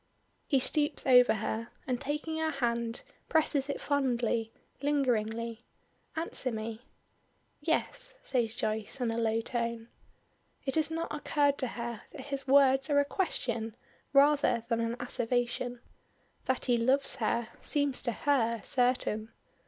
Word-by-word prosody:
He 275 - +3
stoops 295 +3 0
over 250 -3 +7
her, 220 +2 -3 0.2
and 250 -2 -2
taking 300 +3 -2
her 320 0 +1
hand 235 -4 -1 0.3
presses 300 -3 +3
it 280 - -2
fondly, 240 -5 0 0.3
lingeringly. 235 -5 0 0.5
"Answer 320 -5 -1
me." 220 0 -5 0.8
"Yes," - - -1
says 235 -3 0
Joyce 220 +4 -2
in 240 -2 0
a 225 - -2
low 225 0 +1
tone. 235 -1 -3 0.8
It 270 - -1
has 315 -2 +2
not 330 +1 -3
occurred 290 -1 +1
to 260 - 0
her 235 -1 -5
that - - -7
his 275 0 -5
words 270 +1 +5
are 285 -1 +4
a 285 - +3
question 235 - -2 0.4
rather 280 -4 +4
than 230 -1 +1
an 230 0 -1
asseveration. 245 0 -1 0.6
That 260 - 0
he 245 -2 +3
loves 265 +4 +2
her, 235 -1 0
seems 285 -3 0
to 240 - -1
her 235 -2 +1
certain. 245 -4 +1
250 Hz, 135 wpm, -31 LUFS, 230-285 Hz, 0.8 s, over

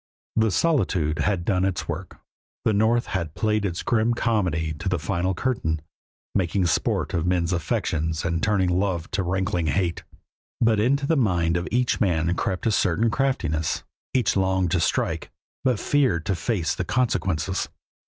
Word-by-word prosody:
The 110 0 +3
solitude 95 - +1
had 95 -5 0
done 95 -2 +1
its 95 -2 -1
work; - - -6 0.4
the 110 - +3
North 110 +3 +3
had 85 -5 -3
played 105 -1 +1
its 90 -3 -2
grim 120 0 +2
comedy 90 -10 0
to 85 - -2
the 90 - +1
final 90 +3 -1
curtain, 80 -12 -1 0.5
making 95 0 +1
sport 85 - 0
of 85 0 0
men's 90 0 +1
affections 80 -1 -1
and 85 -1 0
turning 100 -4 +2
love 95 -4 -1
to 95 - 0
rankling 95 -1 0
hate. 85 +2 0 0.6
But 115 -2 +3
into 140 +6 +2
the 160 - +2
mind 90 -9 +2
of 90 +1 -1
each 125 +1 +1
man 85 -4 +2
crept 95 +1 -2
a 115 - +3
certain 105 +3 +2
craftiness. 120 - 0 0.3
Each 130 -2 +2
longed 95 -2 +1
to 90 - +2
strike, - - 0 0.3
but 125 -5 +2
feared 130 - +1
to 95 - 0
face 85 -3 -1
the 90 - -3
consequences. 95 -5 0
95 Hz, 165 wpm, -24 LUFS, 85-110 Hz, 0.6 s, The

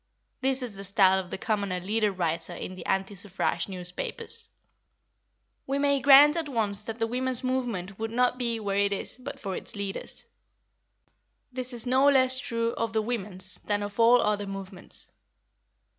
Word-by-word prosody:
This 265 -1 0
is 240 -4 -5
the 195 - -8
style 190 -1 +4
of 185 -2 -6
the - - -4
commoner 200 -3 -1
leader 210 +3 +1
writer 170 -2 -2
in 185 - -6
the 185 -2 -9
anti 195 +1 0
suffrage 195 0 -2
newspapers. 195 - -6 1.2
We 275 +1 0
may 280 0 +3
grant 285 +3 +8
at 325 -3 -2
once 210 -5 +1
that 225 +1 -6
the 225 - +1
women's 255 +2 +1
movement 235 -8 -2
would 225 0 -2
not 250 +2 +1
be 235 -2 0
where 200 -2 -1
it 200 0 +2
is 200 - -4
but 275 +2 -7
for 195 -6 -4
its - - -5
leaders. 200 -1 -3 1.3
This 255 0 -3
is 240 -1 -2
no 260 +3 +4
less 260 -2 +4
true 230 -4 -1
of 230 -1 -2
the 220 - +2
women's 200 -5 -4
than 205 -1 0
of 205 +2 -7
all 235 +1 +6
other 205 -1 0
movements. 195 -1 -8
220 Hz, 175 wpm, -27 LUFS, 195-255 Hz, 1.3 s, grant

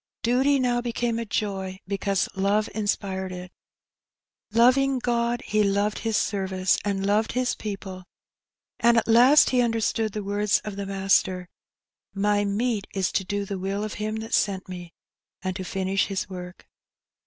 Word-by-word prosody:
Duty 265 +4 +3
now 245 -1 +1
became 235 -1 -1
a 230 - -3
joy, 195 -3 -3
because 195 -1 0
love 200 +2 +1
inspired 195 -3 -2
it. 180 0 -8 1.0
Loving 255 +4 +4
God, 240 -1 0
he 215 0 +2
loved 205 +1 +1
His 225 -2 0
service 190 -2 0
and 195 -1 -1
loved 210 +2 +1
His 250 0 0
people; 195 -3 -6 0.7
and 235 0 +4
at 230 - +2
last 245 +6 +6
he 250 -1 +3
understood 225 -2 0
the 210 - -4
words 205 +1 +1
of 210 -2 -6
the 200 0 -5
Master, 190 -2 +1 0.7
''My 205 +1 +1
meat 210 0 -1
is 190 -2 0
to 195 - 0
do 200 +2 -3
the 195 -1 -4
will 195 +2 -2
of 215 - -4
Him 215 +1 -2
that 220 0 -6
sent 195 -2 +1
Me, 175 -2 -8 0.5
and 185 -1 -2
to 190 - -4
finish 190 +1 -1
His 195 -2 -3
work." 180 -1 -9
205 Hz, 160 wpm, -25 LUFS, 190-230 Hz, 1.0 s, last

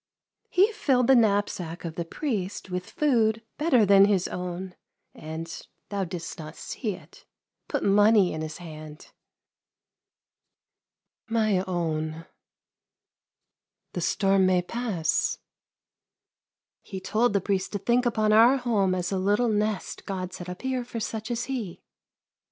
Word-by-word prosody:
" - - -63
He 395 +5 +4
filled 270 - +2
the 265 - +6
knapsack 200 -7 +1
of 165 - -4
the 170 +1 -4
priest 200 - -4
with 180 0 -4
food 225 -6 +2 0.2
better 265 -8 +4
than 195 0 +7
his 195 -3 +2
own, 180 +1 -5 0.4
and 160 +1 -6 0.3
— - - -49
thou 200 -2 -1
didst 170 -1 -6
not 155 0 -8
see 215 -6 -4
it - - -17 0.2
— - - -58
put - - -1
money 205 -1 +5
in 155 - -4
his 155 0 -5
hand." 155 -3 -10 0.5
" - - -66 1.5
My 215 -5 +2
own, 160 -2 -2 1.7
the 175 - -3
storm 195 +1 +3
may 180 -1 +3
pass." 210 -5 -1 0.8
'* - - -67
He 190 - -7
told 220 +5 +1
the 200 - +3
priest 190 0 -1
to - - 0
think 240 +4 +2
upon 215 -2 +2
our 235 +5 +7
home 210 -7 +1
as 180 0 -2
a 190 - 0
little 205 +5 +2
nest 210 -1 -2
God 185 -2 -4
set 175 0 -7
up 180 +5 -8
here 260 -1 -1
for 235 -1 -6
such 220 +1 -4
as 240 -1 -1
he." 235 -10 -5
200 Hz, 150 wpm, -26 LUFS, 180-230 Hz, 1.7 s, than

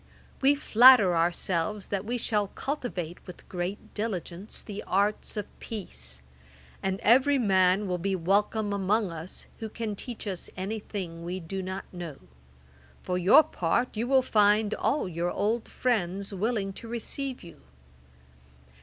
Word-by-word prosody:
We 275 +2 +5
flatter 240 -8 +7
ourselves 175 +3 0
that 200 0 -2
we 240 +3 -1
shall 210 -3 0
cultivate, 195 - -4
with 180 - -11
great 180 +3 -5
diligence, 200 -3 -4
the 210 -1 -6
arts 205 +3 0
of 205 - -2
peace; 65 - -5 0.6
and 190 0 -1
every 265 +5 +5
man 190 -3 +3
will 180 -1 -1
be 195 +2 0
welcome 205 +4 +1
among 200 0 +1
us 165 +2 -8
who 220 - -5
can 215 -1 -4
teach 235 +2 -7
us 190 -4 -4
any 200 +4 -3
thing 175 -6 -6
we 180 +2 -4
do 190 +3 -5
not 190 +1 -5
know. 170 -5 -6 0.9
For 180 0 -1
your 205 - +7
part, 225 - -1
you 230 +3 -1
will 265 0 +4
find 210 -2 +3
all 290 -7 0
your 170 0 -2
old 220 +5 -1
friends 200 -5 -1
willing 200 0 -1
to 230 - -10
receive 250 +3 -4
you. 170 - -13
200 Hz, 145 wpm, -28 LUFS, 180-225 Hz, 0.9 s, flatter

